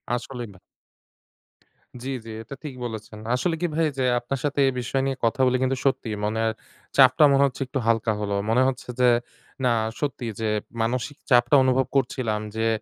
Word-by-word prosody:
আসলেই 120 -1 -6
না। 95 - -18 1.4
জ্বি, 135 - -3
জ্বি। 115 - -7
এটা 135 +5 -9
ঠিক 150 -4 -6
বলেছেন। 110 -2 -7 0.2
আসলে 165 +6 0
কি 175 - +2
ভাই 160 -1 +2
যে 130 - 0 0.2
আপনার 135 +3 -4
সাথে 145 -1 -1
এই - - +3
বিষয় 135 +3 -1
নিয়ে 135 -1 -1
কথা 115 +3 +1
বলি 130 0 +3
কিন্তু 130 0 +1
সত্যিই 125 -6 0
মনের 110 +1 0 0.5
চাপটা 130 +2 +7
মনে 140 0 +5
হচ্ছে 135 0 -3
একটু 135 0 -2
হালকা 115 -1 +2
হলো। 100 -1 -2
মনে 125 +3 +4
হচ্ছে 130 -1 -4
যে 125 -1 +6 0.6
না 125 - +4 0.3
সত্যি 140 -4 -3
যে 110 - -1 0.3
মানসিক 125 +5 -2
চাপটা 120 +2 +5
অনুভব 130 0 +2
করছিলাম। 125 -4 0 0.2
যে 115 0 +1
125 Hz, 180 wpm, -24 LUFS, 115-135 Hz, 1.4 s, চাপটা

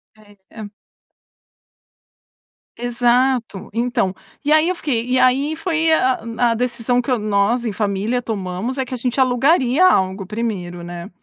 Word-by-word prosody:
É, 205 -1 -20
é. 215 -2 -9 2.1
Exato. 245 -2 0
Então, 235 -4 0 0.3
e 295 - 0
aí 310 +2 +4
eu 365 - -1
fiquei 250 -9 -2
e 255 +1 +1
aí 275 +5 +2
foi 325 -1 0
a 260 -5 +3
a - - -12
hum, 230 0 0
decisão 245 0 0
que 250 +1 0
nós 215 +3 0
em 220 - -1
família 210 +4 -1
tomamos 205 +3 -4
é 265 - 0
que 255 - -8
a - - -2
gente 250 +2 -2
alugaria 265 +4 +3
algo 190 - +2
primeiro, 185 -5 -4
né? 175 +2 -8
240 Hz, 150 wpm, -19 LUFS, 210-255 Hz, 2.1 s, aí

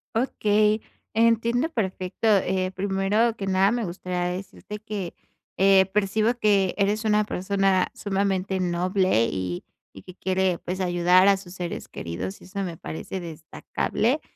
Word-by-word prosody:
Okey. 215 -3 +2 0.3
Entiendo 230 +5 +2
perfecto. 190 - -2
Eh, 190 -3 +2
primero 200 +4 +1
que 195 -3 -5
nada, 190 +1 +3
me 240 -2 -1
gustaría 180 0 -3
decirte 200 +2 -8
que, 205 -4 -5 0.4
eh, 195 0 +6
percibo 210 +3 +2
que 200 -5 +2
eres 210 +2 +1
una 210 0 +3
persona 195 -1 +1
sumamente 195 -1 -1
noble 180 - +2
y 90 -2 -3 0.3
y 95 - -12
que 185 - -12
quiere, 190 -2 0
pues, 180 +3 -5
ayudar 180 +1 +4
a 200 - +6
sus 190 -2 -10
seres 175 -2 -5
queridos, 90 +3 -5
y - - -15
eso 195 +1 -4
me 170 -3 -5
parece 175 +5 -6
destacable. 170 - -2
195 Hz, 140 wpm, -25 LUFS, 180-210 Hz, 0.4 s, eh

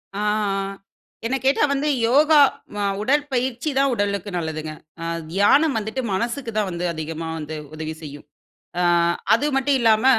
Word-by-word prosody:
ஆ - - -3 1.1
என்ன 245 +4 0
கேட்டா 270 +2 +3
வந்து 280 +2 0 0.2
யோகா, 300 +5 +5 0.4
அ - - -1 0.2
உடற்பயிற்சி 260 +1 0
தான் 275 0 +3
உடலுக்கு 205 -2 -1
நல்லதுங்க. 155 -2 -4 0.3
அ - - -4 0.3
தியானம் 270 - +4
வந்துட்டு 220 +4 -3
மனசுக்கு 235 +5 -2
தான் 210 -2 +1
வந்து 175 0 -3
அதிகமா 160 +1 -5
வந்து 155 0 -6 0.2
உதவி 155 0 -5
செய்யும். 145 -2 -9 0.5
ஆ - - +2 0.5
அது 230 +6 +3
மட்டு 270 +1 +1
இல்லாம, 225 0 +3
220 Hz, 140 wpm, -22 LUFS, 165-270 Hz, 1.1 s, யோகா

